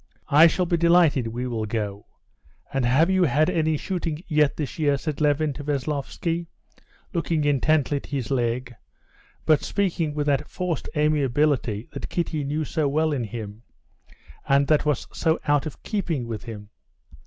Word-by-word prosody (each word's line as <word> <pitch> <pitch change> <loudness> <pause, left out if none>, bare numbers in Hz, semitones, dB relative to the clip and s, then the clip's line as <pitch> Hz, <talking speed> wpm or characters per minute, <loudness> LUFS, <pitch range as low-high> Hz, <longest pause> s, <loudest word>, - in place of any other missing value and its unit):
"I 155 +4 +8
shall 180 +2 0
be 170 0 +1
delighted, 170 -7 +4
we 120 +3 -4
will 115 -3 -3
go. 105 -2 -4 0.7
And 135 -3 +1
have 155 +9 +4
you 190 -1 +4
had 155 +1 +2
any 160 -1 +1
shooting 170 -2 -3
yet 150 -3 +2
this 150 +1 -4
year?" 145 -2 +2
said 155 +1 -4
Levin 150 0 +2
to 145 - -8
Veslovsky, 150 +4 -2 0.7
looking 165 -3 0
intently 145 0 +2
at - - -8
his 135 -5 -3
leg, 125 -1 -1 0.7
but 155 -2 +4
speaking 170 -6 -1
with 150 -1 -1
that 145 0 0
forced 180 -3 -3
amiability 145 -6 +1
that 140 - -6
Kitty 165 -4 -2
knew 150 +3 -2
so 150 +1 0
well 155 +2 +1
in 125 -5 -1
him, 110 -1 -7 0.9
and 140 +1 +4
that 155 -1 +3
was 150 -5 0
so 160 -1 +1
out 145 -1 +2
of 155 - -10
keeping 170 - -2
with 115 -3 -6
him. 105 -3 -8
145 Hz, 165 wpm, -24 LUFS, 130-160 Hz, 0.9 s, I